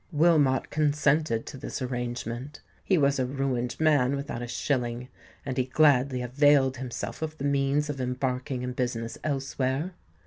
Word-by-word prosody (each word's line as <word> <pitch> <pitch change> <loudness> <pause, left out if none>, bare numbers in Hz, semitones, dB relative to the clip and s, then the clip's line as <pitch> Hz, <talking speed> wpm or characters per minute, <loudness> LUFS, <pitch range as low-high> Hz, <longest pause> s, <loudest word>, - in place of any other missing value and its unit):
Wilmot 150 -4 +3
consented 150 -4 +1
to 140 - -8
this - - -5
arrangement: 125 +1 -4 0.2
he 190 - +2
was 140 -2 +2
a 130 - +2
ruined 130 -2 -2
man 145 -4 +3
without 140 -4 -4
a 120 - -4
shilling; 125 -1 -2 0.4
and 135 -2 -3
he 130 - +2
gladly 130 -2 +3
availed 135 +1 +3
himself 125 +3 -5
of 155 0 -4
the 140 - -6
means 140 +1 +1
of 140 -3 -4
embarking 125 0 -2
in 125 0 -3
business 120 -2 -3
elsewhere. 135 +3 -1
135 Hz, 150 wpm, -27 LUFS, 125-145 Hz, 0.4 s, Wilmot